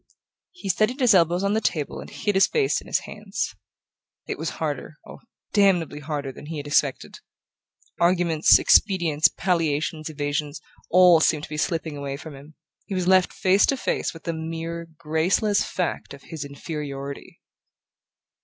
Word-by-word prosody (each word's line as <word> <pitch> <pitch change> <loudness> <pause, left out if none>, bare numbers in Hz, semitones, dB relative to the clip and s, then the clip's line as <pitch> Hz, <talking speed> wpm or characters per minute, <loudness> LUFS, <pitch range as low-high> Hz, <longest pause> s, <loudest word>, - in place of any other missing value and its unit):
He 355 - -9
steadied 215 +7 +1
his 245 -4 +5
elbows 175 0 +3
on 200 +1 +1
the 220 - +1
table 150 -8 -2
and - - -9
hid 205 - -2
his 190 0 +4
face 440 -4 +1
in - - -15
his - - 0
hands. - - -5 0.7
It - - -5
was - - -2
harder, - - -4
oh, - - -11 0.3
damnably 180 -8 +2
harder, 145 -2 -4
than 145 - -12
he 160 0 -5
had 145 - -6
expected! 145 -2 0 0.8
Arguments, 170 -2 +4
expedients, 170 -7 +4
palliations, 160 -2 -1
evasions, 145 0 -3 0.3
all 180 -2 +6
seemed 155 -2 +2
to - - -7
be 150 - -5
slipping 160 -1 -2
away 140 -1 -5
from 155 +1 -10
him: 145 +3 -14 0.3
he 195 - -4
was 180 -1 -1
left 185 -1 +4
face 195 0 +3
to 275 - +1
face - - -1
with 165 - -13
the 170 - -2
mere 165 +1 -5
graceless 170 +6 +1
fact 180 -5 -3
of 140 - -18
his 160 -3 -7
inferiority. 140 -1 -7
165 Hz, 165 wpm, -24 LUFS, 150-185 Hz, 0.8 s, all